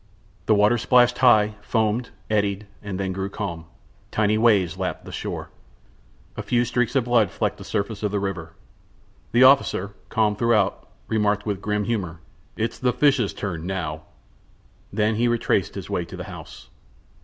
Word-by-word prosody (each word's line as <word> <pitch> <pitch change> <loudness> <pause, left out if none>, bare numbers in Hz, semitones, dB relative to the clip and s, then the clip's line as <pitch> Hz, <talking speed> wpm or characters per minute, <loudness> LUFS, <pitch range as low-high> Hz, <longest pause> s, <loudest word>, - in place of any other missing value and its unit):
The 110 - +5
water 105 +3 +4
splashed 125 +1 +4
high, 110 -4 +5
foamed, 110 +2 0 0.2
eddied, 105 -1 0 0.2
then 95 -2 -3
grew 95 +1 -3
calm; 85 -6 -5 0.4
tiny 110 0 +1
waves 105 -7 +3
lapped 95 - -3
the - - -9
shore. - - -5 0.8
A - - -4
few 120 0 +1
streaks 125 +1 0
of 135 - +3
blood 120 -3 +3
flecked - - -2
the - - -8
surface 100 +1 -3
of 105 - 0
the 100 0 -1
river. 95 -5 -4 0.8
The 120 +3 +5
officer, 130 -7 +4 0.2
calm 105 -2 +2
throughout, 105 -3 +1 0.2
remarked, 105 -1 +1
with 100 -3 -2
grim 105 0 -1
humor: 95 -7 -3 0.4
"It's 115 +1 -2
the 125 -1 +1
fishes' 130 -4 +3
turn 90 -4 -4
now!" 80 -5 -3 0.9
Then 105 +1 +1
he 120 +2 +2
retraced 120 -1 0
his - - -6
way - - -1
to - - -10
the - - -5
house. - - -11
105 Hz, 160 wpm, -23 LUFS, 100-115 Hz, 0.9 s, The